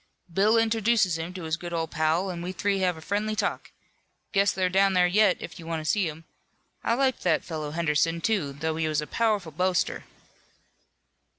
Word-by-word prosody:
Bill 210 Hz, +5 st, +4 dB
introduces 220 Hz, -5 st, +2 dB
him 165 Hz, +2 st, -4 dB
to 185 Hz, -, -6 dB
his 160 Hz, +1 st, -1 dB
good 175 Hz, 0 st, -7 dB
old 165 Hz, -1 st, -2 dB
pal, 165 Hz, +4 st, +1 dB
an' 170 Hz, -1 st, -6 dB
we 180 Hz, +1 st, -4 dB
three 195 Hz, +1 st, 0 dB
have 180 Hz, -3 st, +1 dB
a -, -, -10 dB
friendly 210 Hz, +5 st, -1 dB
talk. 210 Hz, -1 st, -2 dB, 0.6 s
Guess 200 Hz, -1 st, +3 dB
they're 185 Hz, -1 st, 0 dB
down 195 Hz, +1 st, +3 dB
there 180 Hz, -1 st, +4 dB
yet, 195 Hz, +1 st, +4 dB
if -, -, -8 dB
you 165 Hz, -, -10 dB
want 165 Hz, -1 st, -2 dB
to 155 Hz, -, -7 dB
see 190 Hz, +1 st, +1 dB
'em. 155 Hz, +2 st, -10 dB, 0.6 s
I 230 Hz, -, +2 dB
liked 260 Hz, -1 st, +1 dB
that -, -, +1 dB
fellow, 155 Hz, -3 st, -4 dB
Henderson, 165 Hz, +1 st, +1 dB
too, 185 Hz, -7 st, 0 dB
though 155 Hz, +3 st, -3 dB
he 160 Hz, -1 st, 0 dB
was 155 Hz, -1 st, 0 dB
a -, -, -4 dB
powerful 210 Hz, -4 st, 0 dB
boaster." 180 Hz, +3 st, 0 dB
180 Hz, 200 wpm, -26 LUFS, 160-205 Hz, 0.6 s, Bill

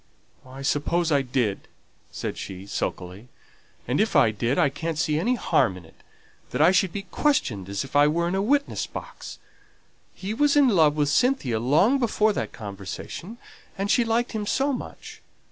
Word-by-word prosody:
"I 135 Hz, +2 st, -9 dB
suppose 165 Hz, +4 st, 0 dB
I 140 Hz, -2 st, +3 dB
did," 125 Hz, -6 st, -2 dB, 0.4 s
said -, -, -5 dB
she, 95 Hz, 0 st, -8 dB
sulkily. 95 Hz, +2 st, -5 dB, 0.6 s
"And -, -, +1 dB
if -, -, 0 dB
I 110 Hz, -, +5 dB
did, 115 Hz, +5 st, -1 dB
I -, -, +4 dB
can't 160 Hz, +3 st, -4 dB
see 155 Hz, -1 st, +1 dB
any 240 Hz, +9 st, +1 dB
harm 95 Hz, -, +1 dB
in 90 Hz, -, -13 dB
it, -, -, -18 dB, 0.6 s
that -, -, -4 dB
I 160 Hz, +4 st, +6 dB
should 185 Hz, -1 st, +2 dB
be 200 Hz, +2 st, -5 dB
questioned 175 Hz, -, -1 dB
as 100 Hz, 0 st, -2 dB
if 135 Hz, -, -11 dB
I 145 Hz, +1 st, +6 dB
were 170 Hz, +3 st, 0 dB
in 175 Hz, -, -2 dB
a 195 Hz, -, +1 dB
witness 280 Hz, +7 st, 0 dB
box. -, -, -9 dB, 0.8 s
He 195 Hz, +3 st, -5 dB
was 290 Hz, +5 st, +2 dB
in 285 Hz, -3 st, +5 dB
love 160 Hz, -8 st, +4 dB
with 145 Hz, -2 st, +1 dB
Cynthia 145 Hz, -, +1 dB
long 160 Hz, -, +3 dB
before 215 Hz, -3 st, +2 dB
that -, -, -3 dB
conversation, 105 Hz, -, -8 dB, 0.4 s
and 195 Hz, +1 st, -1 dB
she 240 Hz, -, +4 dB
liked 230 Hz, +1 st, 0 dB
him 215 Hz, -2 st, -4 dB
so 275 Hz, +5 st, +1 dB
much. 250 Hz, -, -8 dB
160 Hz, 180 wpm, -25 LUFS, -, 0.8 s, I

